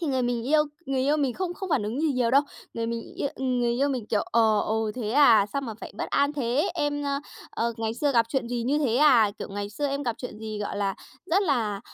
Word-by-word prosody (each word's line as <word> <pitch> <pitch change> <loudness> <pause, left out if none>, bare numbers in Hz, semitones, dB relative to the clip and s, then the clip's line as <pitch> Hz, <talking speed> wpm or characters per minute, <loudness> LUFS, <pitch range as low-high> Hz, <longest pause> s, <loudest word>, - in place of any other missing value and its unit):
thì 335 - -2
người 260 -2 0
mình 240 -1 -1
yêu 305 0 +5 0.2
người 270 -1 0
yêu 285 +3 +2
mình 275 -5 0
không 360 -2 -3
không 385 0 -6
phản 240 - +2
ứng 225 +7 -3
gì 310 -3 +2
nhiều 245 -2 +1
đâu. 275 +3 +5 0.3
Người 230 0 -2
mình 230 0 -5
yêu 280 - -1
người 250 -2 0
yêu 270 +4 +1
mình, 250 -6 -3
kiểu, 210 -2 +1
ờ: 220 -2 +3
"Ồ, 220 0 -1
thế 225 -4 -3
à, 235 -6 +6
sao 280 - -1
mà 225 -4 -5
phải - - -8
bất - - -3
an 285 +1 +2
thế? 275 +4 0
Em, 290 -3 -1
ơ, 280 0 -1 0.3
ờ, 235 0 -1
ngày 225 0 -2
xưa 285 +3 0
gặp 230 -2 +3
chuyện 245 -2 -1
gì 240 -1 -2
như 280 +5 +1
thế 250 -5 +1
à? 255 -8 +5
Kiểu, - - -6
ngày 205 +1 -4
xưa 290 +7 -2
em 280 +1 -2
gặp 240 -4 -1
chuyện 250 -4 -7
gì, 215 -1 -5
gọi 205 -1 -4
là, 195 -1 0 0.3
rất 380 +4 +2
là, 225 - 0
245 Hz, 265 wpm, -26 LUFS, 225-285 Hz, 0.3 s, à